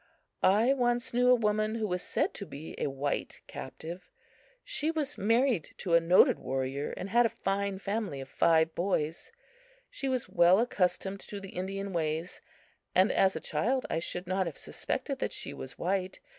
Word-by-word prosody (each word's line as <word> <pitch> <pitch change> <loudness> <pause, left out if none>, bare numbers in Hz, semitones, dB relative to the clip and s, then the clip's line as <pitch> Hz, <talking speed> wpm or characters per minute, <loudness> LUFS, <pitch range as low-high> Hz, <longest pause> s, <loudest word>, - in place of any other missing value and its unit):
I 220 +7 +5
once 240 -2 0
knew 250 +1 +4
a 250 - +8
woman 215 -1 +1
who 220 -1 -1
was 180 -1 -1
said - - 0
to 200 - -6
be 150 +3 -8
a - - 0
white 140 +1 -3
captive. 170 +3 -8 0.5
She 310 - -2
was 300 -3 -1
married 230 - +1
to 175 - -2
a 170 - +8
noted 170 +2 +5
warrior, 135 +2 -2
and 190 +2 -5
had 240 +1 +5
a - - -13
fine 195 0 0
family 200 -6 -3
of 135 - -7
five 160 +3 +3
boys. 170 -3 -1 0.6
She 275 - -3
was 255 -2 -1
well 175 +3 +5
accustomed 195 -3 0
to 205 - -7
the 195 -1 -9
Indian 195 +2 -4
ways, 160 +1 -2 0.5
and 185 +3 +5
as 190 0 +3
a - - -2
child 255 +3 0
I - - +1
should 175 +2 -3
not 185 0 0
have 165 - -6
suspected - - -4
that - - -2
she - - -5
was 130 - -8
white. 185 +1 -1
190 Hz, 180 wpm, -30 LUFS, 170-225 Hz, 0.6 s, a